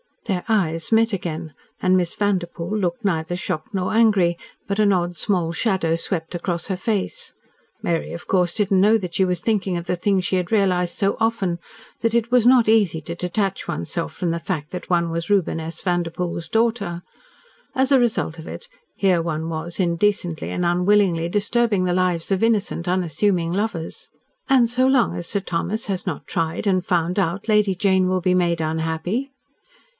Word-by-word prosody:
Their 190 -5 -1
eyes 165 -6 0
met 225 0 +4
again, 165 -4 -4 0.3
and 185 0 +3
Miss 175 -2 0
Vanderpoel 185 -2 -1
looked 210 +4 -1
neither 165 -2 0
shocked 175 0 -4
nor 185 0 -1
angry, 205 -7 +3 0.3
but 200 +1 -2
an 210 -1 +4
odd 175 -1 -1
small 180 -6 +1
shadow 175 -3 0
swept 165 0 -3
across 175 -1 -2
her 190 - -1
face. 220 - -3 0.5
Mary, 165 -1 -1
of 170 - -8
course, 180 -2 +2
did 205 -3 0
not 195 - +4
know 210 +4 +5
that 180 -5 -6
she 190 - +2
was 180 -2 -1
thinking 200 -4 0
of 170 - -5
the 180 - 0
thing 195 +2 +1
she 185 +1 0
had 180 +1 -2
realised 185 -5 +1
so 200 -1 +1
often 215 -6 0 0.4
that 230 0 0
it 235 0 +1
was 250 -2 +4
not 245 -2 +6
easy 205 -8 +3
to 165 - -6
detach 195 +2 -2
one's 85 +2 -4
self 170 - -2
from 175 -3 -2
the 170 - -2
fact 160 -4 -4
that 180 - -7
one 170 -2 +1
was 170 +2 -3
Reuben 195 -5 +2
S. 160 0 -5
Vanderpoel's 175 -1 -2
daughter. 225 -7 0 0.7
As 265 0 +2
a 270 - +6
result 180 -9 0
of 160 - -9
it 480 - -8 0.3
here 185 -4 +2
one 160 -1 -3
was 165 +2 -5
indecently 175 -2 0
and 180 - -2
unwillingly 180 -1 +2
disturbing 210 0 +1
the 180 - +1
lives 180 -1 0
of 190 - +1
innocent, 210 -6 +1
unassuming 175 0 +1
lovers. 195 -5 -3 0.4
"And 255 -3 +5
so 255 +2 +2
long 265 -3 +3
as 175 - -5
Sir 200 - -1
Thomas 190 +5 -2
has 190 -1 -3
not 160 -6 -3
tried 165 +5 -2
and 185 -3 +2
found 175 +1 +1
out 190 +2 -1
Lady 210 -3 +3
Jane 190 0 +2
will 185 0 0
be 185 0 +2
made 170 -2 +1
unhappy?" 160 - -2
185 Hz, 190 wpm, -22 LUFS, 170-205 Hz, 0.7 s, not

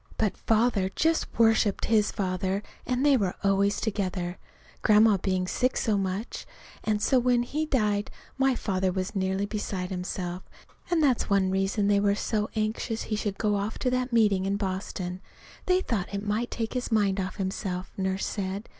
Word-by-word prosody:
But 215 -3 +1
Father 220 -4 +2
just 325 0 +2
worshipped 225 -3 +3
his 215 -2 +3
father, 190 +1 -1 0.2
and 250 +2 +1
they 285 -2 +6
were 195 -7 0
always 200 +1 +2
together 185 -4 -2 0.4
Grandma 215 -1 +5
being 185 -1 0
sick 255 +6 0
so 220 -3 +1
much; 195 +3 -3 0.4
and 215 -1 +1
so 260 - +4
when 245 -1 +2
he 305 +5 -2
died 210 -6 +1 0.3
my 270 -1 +2
father 190 -4 0
was 185 +1 -3
nearly 190 +1 0
beside 200 -3 -4
himself, 180 0 -4 0.5
and 340 -3 +2
that's 260 -5 +2
one 195 -2 +3
reason 195 +2 +1
they 205 0 +4
were 200 0 +2
so 210 0 -1
anxious 220 +1 -1
he 215 - -2
should 205 -2 -2
go 205 -1 0
to 250 - -2
that 255 0 0
meeting 205 -5 +3
in 200 +1 0
Boston. 185 -2 -4 0.5
They 365 0 +4
thought 210 - -2
it 200 +1 -4
might 215 +4 -1
take 225 -1 -3
his 250 -1 -3
mind 200 -3 +2
off 185 -1 -3
himself, 190 -1 -3
Nurse 190 0 -1
said. 200 +1 -4
205 Hz, 170 wpm, -27 LUFS, 190-225 Hz, 0.5 s, they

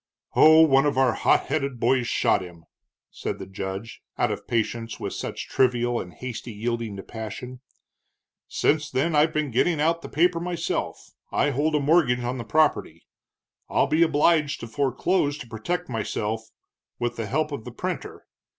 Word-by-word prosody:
"Oh, 160 +1 +8
one 135 -2 +4
of 145 - -1
our 130 -3 +4
hot - - +3
headed 140 -3 -2
boys 125 +1 +2
shot 115 - +2
him," 85 -2 -11 0.5
said - - -4
the - - -7
judge, 95 +3 -6 0.2
out - - +1
of - - -6
patience 115 0 -2
with - - -4
such - - -5
trivial 120 -2 +1
and 90 - -9
hasty 125 +4 -7
yielding 115 0 -3
to 95 - -7
passion. 120 +3 -7 0.9
"Since 150 0 +1
then 155 +3 0
I've 150 +2 +4
been 155 -3 -1
getting 155 +7 +2
out 165 +2 +1
the - - -8
paper 170 +2 +2
myself 170 -1 -3 0.2
I 145 - +2
hold 150 +4 0
a - - +3
mortgage 140 -4 +3
on 125 +1 -3
the - - -4
property, 130 - +1 0.6
I'll - - +3
be 155 +2 +1
obliged 155 -1 +3
to 115 - -6
foreclose 145 +5 0
to 140 -5 -9
protect 165 +11 -3
myself 110 -1 -3 0.5
with 120 0 -2
the 115 -2 -4
help 155 +4 0
of 140 -6 -5
the - - -8
printer. - - -5
130 Hz, 170 wpm, -25 LUFS, 115-155 Hz, 0.9 s, Oh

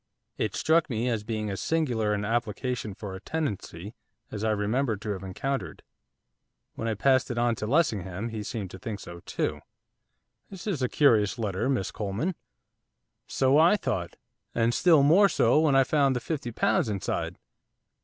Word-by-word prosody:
It - - -2
struck 160 +1 +2
me 120 0 -1
as 110 -3 -1
being 110 -1 -3
as 95 - -4
singular 125 -10 0
an 105 0 -3
application 115 -1 -2
for 100 -3 -7
a 95 - -7
tenancy 105 - -4 0.4
as 105 0 -5
I 110 - +2
remembered 110 +2 0
to 105 - -2
have 95 -3 -4
encountered. 130 +9 -4 0.9
When 115 - -4
I 110 - 0
passed 130 +4 +3
it 120 - -3
on 120 0 +2
to 105 - -3
Lessingham, 110 - 0
he 110 -1 -5
seemed 105 -3 -5
to 95 - -9
think 105 0 -5
so 85 -2 -9
too. - - -2 0.9
'This 190 -3 -9
is 190 -10 -2
a 125 - +1
curious 110 -7 +3
letter, 105 +1 -1
Miss 125 -8 0
Coleman.' 105 - -2 0.9
'So 135 +2 +3
I 170 +6 +6
thought, 110 - -3 0.4
and 115 0 +2
still 160 -2 +5
more 185 +8 +6
so 150 - +3
when 155 -3 +3
I 135 - +6
found 140 -1 +2
the - - 0
fifty 135 -2 -4
pounds 185 - +1
inside. 100 -3 -3
115 Hz, 175 wpm, -27 LUFS, 105-140 Hz, 0.9 s, I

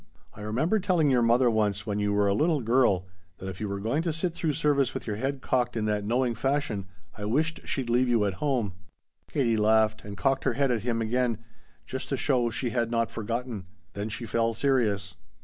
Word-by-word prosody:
I 105 - -11
remember 135 - +1
telling 180 -7 +2
your 125 -2 +4
mother 120 +2 +4
once 105 -2 0
when 105 -1 -2
you 105 0 +1
were 100 0 +2
a 100 - +3
little 155 +6 +2
girl 115 -6 +3 0.3
that 95 - -7
if 95 0 -6
you 105 - -2
were 100 0 -3
going 115 +10 0
to 165 0 -1
sit 165 +2 -1
through 165 -3 -1
service 140 -4 +1
with - - -4
your 105 -2 -3
head 135 +3 -2
cocked 120 -2 0
in 110 - 0
that 105 -1 0
knowing 120 +3 +1
fashion 120 -5 -1 0.3
I 105 - -6
wished 155 +9 -1
she'd 130 -3 -1
leave 125 +2 +2
you 115 -3 +3
at 100 - 0
home." 125 -10 0 0.6
Katie 120 -6 +1
laughed 110 0 +3
and 100 -1 -8
cocked 135 +2 +1
her - - +2
head 140 -2 +1
at 115 -3 0
him 115 0 -1
again, 115 -1 0 0.4
just 130 - -5
to 135 - 0
show 125 -3 +2
she 120 +1 -2
had 115 -1 0
not 115 -1 0
forgotten. 115 -3 -4 0.3
Then 100 +2 -4
she 115 +2 -4
fell 115 0 0
serious. 105 -10 0
115 Hz, 220 wpm, -27 LUFS, 105-135 Hz, 0.6 s, your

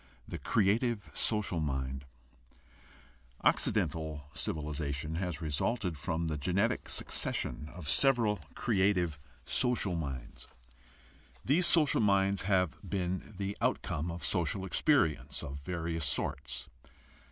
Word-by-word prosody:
THE - - -5
CREATIVE 110 +1 +1
SOCIAL 105 -6 +1
MIND 65 -2 -2 1.4
Occidental 80 -3 +1
civilization 75 +1 -2
has 90 -3 -3
resulted 85 - -1
from 80 +4 -2
the 75 -2 -2
genetic 100 - 0
succession 75 - -1
of 85 -5 -7
several 115 - +4 0.2
creative 95 - +1 0.3
social 110 -7 +2
minds. 65 -7 -5 1.0
These 170 +7 +4
social 150 -8 +4
minds 100 -1 +3
have 95 -3 +1
been 95 +1 -3
the 100 +1 -2
outcome 80 +4 0
of 85 0 -4
social 95 +2 0
experience 80 - +2
of 70 0 -6
various 80 0 -3
sorts. - - -2
90 Hz, 105 wpm, -32 LUFS, 75-100 Hz, 1.4 s, several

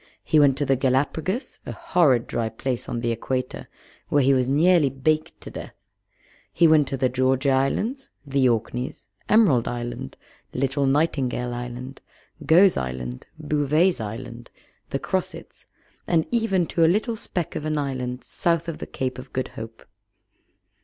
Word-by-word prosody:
He 155 - +3
went 140 -2 +5
to 145 - 0
the 135 0 +3
Gallapagos, 145 - -1
a - - -6
horrid 135 -9 +2
dry 115 -1 -2
place 120 +3 -3
on 120 - -3
the 115 -1 0
Equator, 125 +3 -3 0.4
where 145 -1 +3
he 135 +1 +4
was 130 -1 +2
nearly 155 +2 +4
baked 155 +4 -1
to - - -9
death; - - -8 0.8
he 170 - +4
went 155 -3 +5
to 135 - -3
the 130 0 +2
Georgia 130 +2 +1
Islands, 210 - 0 0.2
the 135 -2 +2
Orkneys, 115 -1 -3 0.2
Emerald 185 - +4
Island, 120 - -5 0.4
Little 135 +2 0
Nightingale 135 -4 0
Island, 125 +2 -7 0.4
Gough's 180 +4 +5
Island, 65 -1 -5
Bouvet's 150 +1 +1
Island, 115 +2 -7 0.4
the - - -1
Crossets, - - -4 0.4
and 165 -2 +2
even 220 -7 +1
to 165 - +1
a 160 - +6
little 215 +5 +1
speck 180 -6 -4
of - - -3
an 155 0 -1
island 130 -3 -3
south 170 -1 -1
of 165 - -5
the - - -6
Cape 130 -1 -3
of 130 +1 -11
Good 130 - -2
Hope. 110 0 -10
135 Hz, 155 wpm, -24 LUFS, 125-160 Hz, 0.8 s, a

